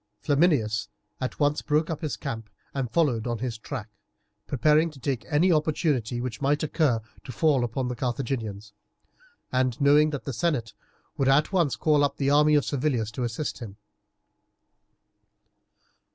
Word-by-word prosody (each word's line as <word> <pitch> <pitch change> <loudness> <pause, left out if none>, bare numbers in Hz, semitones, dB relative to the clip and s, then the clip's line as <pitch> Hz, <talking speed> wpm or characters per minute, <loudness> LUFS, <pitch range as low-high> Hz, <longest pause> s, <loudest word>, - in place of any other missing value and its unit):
Flaminius 135 -9 +2 0.3
at 130 - -4
once 145 0 +2
broke 155 +2 0
up 160 - -4
his 150 -7 -3
camp 115 -2 -5 0.2
and 135 -3 -2
followed 125 -5 +1
on 120 -1 -1
his 120 -2 -4
track, 120 -2 -6 0.6
preparing 150 +4 +3
to 150 -3 -14
take 125 -3 -2
any 165 +5 +4
opportunity 150 -7 0
which 120 -2 -5
might 145 +2 +1
occur 150 -6 +1 0.2
to 130 - -8
fall 140 0 +2
upon 125 +2 -2
the 125 - -3
Carthaginians, 115 -5 -3 0.8
and 130 -2 0
knowing 145 +2 +5
that 145 -3 -5
the 135 - -4
senate 135 -6 -1 0.4
would 135 - +1
at 145 +4 +4
once 170 -8 +2
call 150 -2 +2
up 145 - 0
the 140 0 +1
army 150 +1 +5
of 145 - +3
Servilius 125 -6 -1
to 125 +4 -4
assist 120 +5 -3
him. 105 -5 -9
135 Hz, 155 wpm, -26 LUFS, 120-150 Hz, 0.8 s, knowing